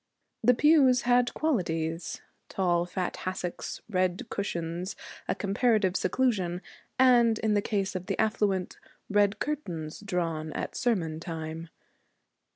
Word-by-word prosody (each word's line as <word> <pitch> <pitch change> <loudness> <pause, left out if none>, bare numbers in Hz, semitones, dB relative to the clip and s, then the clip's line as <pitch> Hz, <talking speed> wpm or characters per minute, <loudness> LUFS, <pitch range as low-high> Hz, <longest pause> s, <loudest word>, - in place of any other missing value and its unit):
The 245 +2 +5
pew 295 -1 +6
had 245 0 +3
qualities: 165 - -1 0.3
tall 175 -2 +1
fat 180 0 -3
hassocks, 185 -1 -4
red 185 -1 0
cushions, 175 -1 -3 0.3
a - - 0
comparative 200 -2 +2
seclusion, 185 -5 0 0.3
and, 240 -3 +5
in 220 -1 +1
the 205 - +3
case 195 -2 -1
of 185 +1 -4
the - - -1
affluent, 205 -4 0 0.3
red 205 0 +3
curtains 180 - -4
drawn 165 -6 -2
at - - -4
sermon 170 -10 0
time. 165 -1 -6
190 Hz, 120 wpm, -28 LUFS, 170-225 Hz, 0.3 s, pew